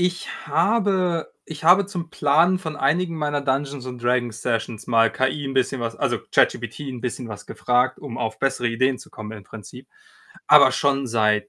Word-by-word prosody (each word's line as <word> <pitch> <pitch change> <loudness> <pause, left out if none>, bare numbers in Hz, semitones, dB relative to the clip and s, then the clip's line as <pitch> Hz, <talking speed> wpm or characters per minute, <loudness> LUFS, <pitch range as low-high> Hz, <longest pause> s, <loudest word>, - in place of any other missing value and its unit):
Ich 180 -1 -3
habe 185 +1 +1 0.2
ich 160 0 -9
habe 185 +4 +6
zum 175 -4 -6
Planen 165 +6 +3
von 160 -3 -5
einigen 165 +5 0
meiner 145 -1 -1
Dungeons 140 -1 -2
und 125 -1 -7
Dragons-Sessions 120 -2 -2
mal 115 -1 +3
KI 130 +3 -1
'n 135 0 -4
bisschen 130 0 0
was 115 -1 -4
also, - - 0
ChatGPT 120 +4 +1
'n 125 -2 -6
bisschen 125 +1 -4
was 105 -1 -9
gefragt, 125 +1 0
um 135 -6 -8
auf 110 0 -3
bessere 130 -3 0
Ideen 130 +3 0
zu - - -14
kommen 110 -1 -8
im 105 - -12
Prinzip, 105 0 -12 0.6
aber - - +7
schon 140 -2 0
seit 105 -2 +1
135 Hz, 180 wpm, -22 LUFS, 115-160 Hz, 0.6 s, aber